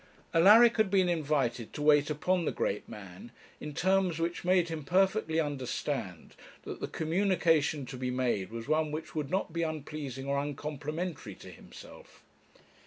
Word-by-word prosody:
Alaric 215 +8 +7
had 220 -3 +3
been 190 -2 +3
invited 140 -8 -1
to - - -6
wait 150 0 +4
upon 175 +4 0
the - - 0
great 100 - -2
man, 95 +2 -10 0.3
in 150 - -6
terms 185 +2 +1
which 170 +1 -2
made 180 -1 +2
him 160 -2 -5
perfectly 185 +1 +1
understand 135 - -4 0.3
that - - -7
the - - -3
communication 160 -4 +1
to 125 - -8
be 125 0 -3
made 125 -7 -1
was 115 +2 -7
one 155 0 +1
which 155 +1 -6
would 150 -3 -3
not 185 -2 -2
be 170 - -1
unpleasing 150 -4 -5
or 140 0 0
uncomplimentary 145 - -5
to - - -12
himself. - - -14
155 Hz, 160 wpm, -30 LUFS, 135-175 Hz, 0.3 s, Alaric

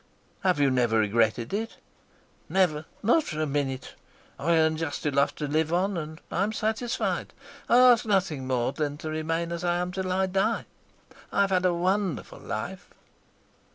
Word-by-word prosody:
"Have 185 -5 +2
you 140 -2 +4
never 120 -3 +2
regretted 110 - +1
it?" 225 +3 -3 0.7
"Never, 165 -5 +2 0.2
not 245 +10 +4
for 155 - -5
a 155 - +1
minute. 135 -2 -2 0.5
I 165 +3 +2
earn 160 0 +3
just 155 -2 -4
enough 140 -1 +2
to 150 - -3
live 155 +2 0
upon, 185 +3 +1
and 155 -1 -5
I'm 200 +4 0
satisfied. 225 +3 -1 0.4
I 240 - +6
ask 250 -2 +7
nothing 185 - 0
more 125 -1 0
than 145 0 -3
to 155 0 -5
remain 165 +2 -2
as 170 0 -4
I 175 -1 +1
am 180 0 -2
till 185 0 -3
I 190 +1 +2
die. 190 +1 0 0.7
I've 200 -1 +2
had 185 -1 +2
a 180 - +3
wonderful 185 -2 -1
life." - - -5
165 Hz, 165 wpm, -27 LUFS, 145-190 Hz, 0.7 s, ask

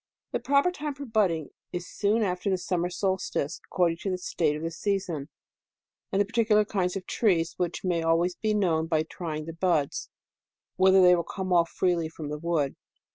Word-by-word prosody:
The - - -1
proper 280 +5 +3
time 300 -5 -4
for 285 +1 -7
budding 195 - +1 0.2
is 175 0 -4
soon 215 +2 +1
after 180 0 -1
the 190 - +2
summer 180 -1 -1
solstice, 180 -4 -2
according 170 -3 +1
to 195 - -4
the 185 - -1
state 160 -4 0
of 155 - -6
the 165 - -2
season, 170 -5 -2 0.8
and 195 - +1
the 205 - +4
particular 215 -1 +3
kind 185 -3 -1
of 195 - -4
trees, 175 -7 +1
which 175 -1 -2
may 175 -3 +1
always 165 +2 +2
be 215 +3 -1
known 165 -6 +1
by 160 -1 +2
trying 155 -2 -5
the 165 - -6
buds, 165 -4 0 0.7
whether 190 0 +6
they 180 0 +7
will 170 - 0
come 185 +1 -3
off 170 -1 +4
freely 175 -3 0
from 155 -2 -7
the 150 0 -4
wood. 160 -4 -1
180 Hz, 190 wpm, -27 LUFS, 165-195 Hz, 0.8 s, they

